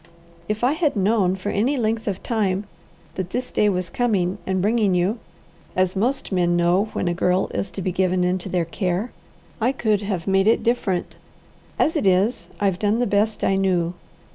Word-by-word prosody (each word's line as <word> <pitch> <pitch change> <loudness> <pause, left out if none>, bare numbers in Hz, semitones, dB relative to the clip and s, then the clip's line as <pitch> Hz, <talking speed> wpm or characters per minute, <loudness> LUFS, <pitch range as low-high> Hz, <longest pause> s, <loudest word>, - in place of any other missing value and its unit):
"If 215 +2 -2
I 250 - +4
had 310 -3 0
known 195 -2 +2
for 190 +2 -4
any 245 +9 +1
length 225 -1 -1
of 195 -2 -3
time 200 -4 0 0.5
that 185 -2 -4
this 250 +5 -3
day 210 - +3
was 180 -2 -2
coming 205 -6 0
and 190 0 0
bringing 210 -1 +2
you, 190 +6 +1 0.6
as 185 0 +1
most 255 +7 -1
men 175 -2 +2
know 175 +4 +3
when - - -1
a 175 - +1
girl 180 +2 +1
is 195 - -2
to 190 - -6
be 185 - 0
given 185 0 +1
into 180 +1 -1
their 175 -2 0
care, 185 +5 -2 0.5
I 240 +4 +3
could 215 -6 0
have 195 -5 -3
made 195 +1 +2
it 225 - +3
different. 215 -6 -1 0.6
As 320 - +2
it 290 -11 +1
is, 190 +6 +2
I've 195 -3 +1
done 210 +1 +1
the 245 - +1
best 210 +1 0
I 195 - +3
knew. 180 -3 +1
195 Hz, 190 wpm, -22 LUFS, 185-220 Hz, 0.6 s, I